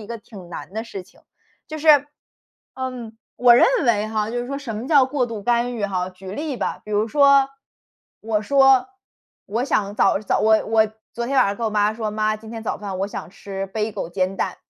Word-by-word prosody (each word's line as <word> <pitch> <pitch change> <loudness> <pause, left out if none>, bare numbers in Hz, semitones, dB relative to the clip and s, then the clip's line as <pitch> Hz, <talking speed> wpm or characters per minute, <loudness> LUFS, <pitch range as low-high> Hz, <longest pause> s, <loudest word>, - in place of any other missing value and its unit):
一 - - -10
个 235 0 -6
挺 200 -4 -13
难 175 - -8
的 220 +1 -3
事 195 -5 -7
情。 180 - -23 0.5
就 310 0 -6
是， 310 +1 -1 0.9
嗯， 250 -4 -6 0.2
我 245 -1 +6
认 240 - +6 0.2
为 215 -3 +2
哈， 215 0 -1
就 245 - -2
是 245 - -5
说 275 +1 -4
什 255 -6 -6
么 230 +5 -5
叫 285 -4 +6
过 260 -1 -1
度 225 -3 -6
干 240 +2 0
预 210 - -2
哈， 185 -2 -2
举 185 +1 -12
个 - - -5
例 295 +2 -4
吧。 - - -3
比 - - -8
如 210 +1 +1
说， 280 +1 +5 0.7
我 220 -1 0
说， 270 0 +4 0.6
我 225 +5 -2
想 205 -6 0
早 210 - +3
早 210 - 0
我 220 0 +4
我 220 0 +3 0.3
昨 235 0 -4
天 275 +2 -1
晚 255 - +6
上 200 - -1
跟 - - -7
我 - - -1
妈 210 0 +2
说： 220 -1 -3
“妈， 215 0 0
今 220 +1 -12
天 225 -1 -7
早 220 - -3
饭 195 -3 -5
我 195 - 0
想 200 - -7
吃 195 0 -6
Bagel 210 -4 -2
煎 185 +1 -1
蛋。” - - -2
220 Hz, 255 characters per minute, -22 LUFS, 205-245 Hz, 0.9 s, 我